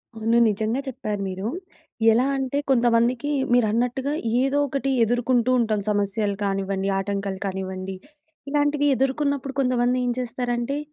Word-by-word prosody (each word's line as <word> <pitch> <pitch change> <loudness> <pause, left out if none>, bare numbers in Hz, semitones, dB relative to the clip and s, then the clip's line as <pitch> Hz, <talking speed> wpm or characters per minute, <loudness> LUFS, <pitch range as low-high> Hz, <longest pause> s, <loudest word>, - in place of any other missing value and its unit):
అవును. 225 +1 +1
నిజంగా 220 +4 -1
చెప్పారు 210 -5 -4
మీరూ. 190 +2 -4 0.6
ఎలా 240 +4 +3
అంటే 270 +1 -2
కొంతమందికి 240 +3 +2 0.2
మీరన్నట్టుగా 245 +4 +1 0.3
ఏదో 275 +2 +1
ఒకటి 275 0 -2
ఎదుర్కుంటూ 245 +1 +1
ఉంటాం 220 -2 +1
సమస్యలు 205 0 0
కానివ్వండి, 195 0 -1
ఆటంకాలు 195 -1 -3
కానివ్వండి. 190 0 -4 0.5
ఇలాంటివి 290 0 +1
ఎదుర్కొన్నప్పుడు 275 +1 -1
కొంతమందేంచేస్తారంటే 245 0 0
240 Hz, 105 wpm, -24 LUFS, 205-260 Hz, 0.6 s, ఎలా